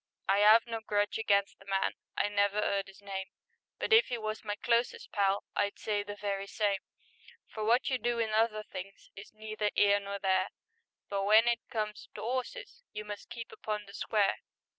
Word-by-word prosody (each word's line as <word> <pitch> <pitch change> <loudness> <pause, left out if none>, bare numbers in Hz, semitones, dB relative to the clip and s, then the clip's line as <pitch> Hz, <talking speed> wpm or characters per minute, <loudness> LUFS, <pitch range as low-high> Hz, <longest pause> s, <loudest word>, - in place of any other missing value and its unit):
I 195 +1 +4
'ave 220 +2 +7
no 230 -1 -4
grudge 205 0 0
against 200 -2 +2
the 195 - -17
man 195 -1 +1 0.2
— - - -46
I - - +2
never 205 0 +1
'eard 200 -2 0
'is 195 +1 -16
name, 190 -1 -4 0.5
But - - 0
if 455 +2 +7
he 245 - -2
was 215 -1 -4
my 205 -1 -2
closest 235 +2 0
pal 200 -1 +2
I'd 200 0 0
say 210 -1 -1
the 205 0 -6
very 200 -1 -3
same, 200 -1 0 0.7
For 215 - -6
wot 235 +4 +3
you 255 - +1
do 240 0 0
in 225 -2 0
other 215 0 +2
things 195 -1 -9
Is 200 +1 -11
neither 215 -1 -2
'ere 205 0 +5
nor 200 0 -5
there, 190 -1 +1 0.6
But 200 - -3
w'en 215 +4 +5
it 235 -1 +3
comes 215 -2 -3
to - - -6
'orses 260 - -4
You 210 0 -6
must 205 -1 -7
keep 230 -1 -7
upon 210 -1 -4
the 200 - -13
square. 205 -2 +1
210 Hz, 200 wpm, -31 LUFS, 200-220 Hz, 0.7 s, ave